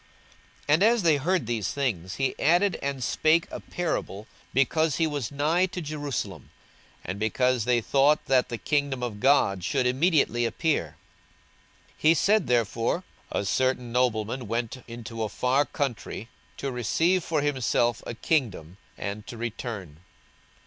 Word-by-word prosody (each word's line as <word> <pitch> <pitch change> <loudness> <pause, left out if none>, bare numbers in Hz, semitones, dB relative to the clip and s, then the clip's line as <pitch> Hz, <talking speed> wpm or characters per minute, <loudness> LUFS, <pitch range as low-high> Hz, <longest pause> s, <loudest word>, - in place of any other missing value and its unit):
42:019:011 145 - +4
And 165 +5 +4
as 230 -1 +4
they 160 -3 +4
heard 175 +2 0
these 110 -4 -2
things, 100 -10 -2
he 135 -1 -1
added 175 +4 +3
and 140 -2 -3
spake 160 +7 +3
a - - -5
parable, 155 - -3 0.3
because 150 +3 +2
he 165 - +2
was 145 -6 -3
nigh 155 +6 +2
to 185 - -6
Jerusalem, 145 - -4 0.6
and 95 +3 -4
because 125 +2 +1
they 120 -1 +2
thought 140 +5 +3
that 130 -2 +2
the 120 - -3
kingdom 140 -1 -1
of 110 -4 -4
God 105 -8 +3
should 125 - 0
immediately 130 -2 +2
appear. 115 - -1 1.0
42:019:012 - - -29
He 155 +1 +5
said 210 +2 +3
therefore, 120 - +1 0.3
A 100 - -1
certain 125 +2 0
nobleman 120 -1 0
went 115 +3 -3
into 115 -1 -7
a 110 - -1
far 130 +6 +1
country 120 -4 -4 0.3
to 140 - -3
receive 165 - +1
for 155 -4 0
himself 120 -4 +1
a 120 - -5
kingdom, 105 - -1 0.2
and 100 +1 -5
to 120 - -8
return. 110 - -5
130 Hz, 150 wpm, -26 LUFS, 115-150 Hz, 1.0 s, He